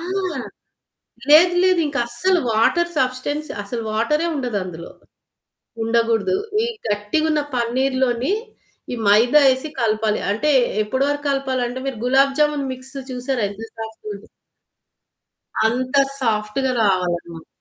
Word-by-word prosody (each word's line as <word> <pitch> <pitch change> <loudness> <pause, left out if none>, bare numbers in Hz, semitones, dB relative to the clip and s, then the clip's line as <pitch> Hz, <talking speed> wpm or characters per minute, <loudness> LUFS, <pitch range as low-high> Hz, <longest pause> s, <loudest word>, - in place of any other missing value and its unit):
ఆ! - - -7 1.3
లేదు 350 +4 +7
లేదు. 370 -2 +4
ఇంకా 285 -1 -3
అసలు 360 +10 +2
వాటర్ 345 +11 +2
సబ్స్టెన్స్ 260 +4 -1
అసలు 230 +3 -5
వాటర్ 235 +9 +1
ఏ - - 0
ఉండదు. 245 -6 -2
అందులో 170 -2 -8 0.9
ఉండకూడదు. 225 -4 +1 0.3
ఈ - - +1 0.2
గట్టిగా 210 +9 0
ఉన్న 300 - +1
పన్నీరులోని 255 +3 0 0.6
ఈ - - -2
మైదా 235 +8 +5
వేసి 260 +3 +1
కలపాలి. 215 -1 +1
అంటే 295 +9 +1 0.3
ఎప్పటి 260 +6 -1
వరకు 290 0 -3
కలపాలి 270 -2 -1
అంటే 250 +2 -5
మీరు 265 - -3
గులాబ్ 270 +2 +3
జామున్ 295 -2 +2
మిక్స్ 260 +2 -11 0.2
చూసారా? 250 0 -2
ఎంత 205 +2 -10 0.2
సాఫ్ట్‌గా 220 -1 -7
ఉంటుంది. 200 +1 -12 1.4
అంత 255 +4 -2 0.3
సాఫ్ట్‌గా 225 +3 0
రావాలన్నమాట 175 -4 -1
250 Hz, 125 wpm, -21 LUFS, 220-275 Hz, 1.4 s, లేదు